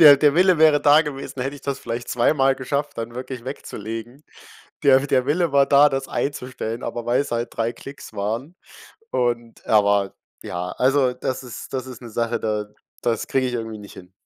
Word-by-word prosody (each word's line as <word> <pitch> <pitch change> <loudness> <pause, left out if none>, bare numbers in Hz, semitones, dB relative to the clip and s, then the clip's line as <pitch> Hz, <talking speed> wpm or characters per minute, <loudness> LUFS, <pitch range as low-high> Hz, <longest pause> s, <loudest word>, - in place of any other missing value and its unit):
der 145 -3 +10
der 145 0 +4
Wille 185 0 +5
wäre 155 -2 +5
da 145 +2 +6
gewesen, 135 -3 -5
hätte 135 +2 -3
ich 145 - -11
das 140 -1 -3
vielleicht 120 -1 -5
zweimal 135 +2 +3
geschafft, 140 +2 -3
dann 115 +1 -5
wirklich 125 -1 -6
wegzulegen. 120 +1 -7 0.6
Der 135 -1 +7
der 130 -2 +2
Wille 165 +3 +1
war 140 0 +5
da, 145 +1 +6
das 135 -1 -2
einzustellen, 125 -5 -3
aber 120 0 -4
weil's 125 +3 +1
halt 120 0 -1
3 115 +1 0
Klicks 140 -4 -11
waren 110 - -3 0.6
und 120 -1 -1
er 105 -2 +4
war 100 -1 +2 0.3
ja, 90 +1 -4
also, 130 0 +2
das 130 +1 -4
ist 120 -3 -9
das 130 -1 -3
ist 130 -2 -10
'ne 120 - -9
Sache, 115 +1 -1
da 105 -1 -1 0.3
das 115 -1 -1
kriege 130 -1 +1
ich 125 - -3
irgendwie 115 -2 -4
nicht 100 -1 -12
hin. 90 0 -13
125 Hz, 195 wpm, -22 LUFS, 115-140 Hz, 0.6 s, der